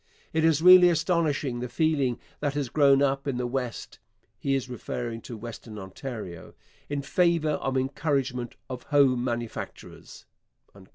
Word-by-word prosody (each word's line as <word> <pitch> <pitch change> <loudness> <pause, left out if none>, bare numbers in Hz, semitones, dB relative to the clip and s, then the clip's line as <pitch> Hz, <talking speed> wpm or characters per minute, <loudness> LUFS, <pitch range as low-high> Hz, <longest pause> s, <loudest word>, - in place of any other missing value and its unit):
It 160 0 +1
is 160 -1 +3
really 180 0 +9
astonishing 160 -6 0
the 125 0 -4
feeling 145 -6 +1 0.2
that 145 -1 -2
has 140 -4 -2
grown 140 0 +4
up 140 0 0
in 135 -3 -1
the 125 - -1
West 125 -1 -4 0.4
[he 135 -1 0
is 135 -2 -2
referring 120 -2 -5
to 115 - -8
Western 110 -1 -9
Ontario] 95 -3 -8 0.3
in 145 -1 -2
favour 170 0 +2
of 135 0 -1
encouragement 130 -2 -1
of 130 -2 -6
home 135 -4 +3
manufactures. 120 -2 -6
135 Hz, 140 wpm, -27 LUFS, 120-150 Hz, 0.4 s, really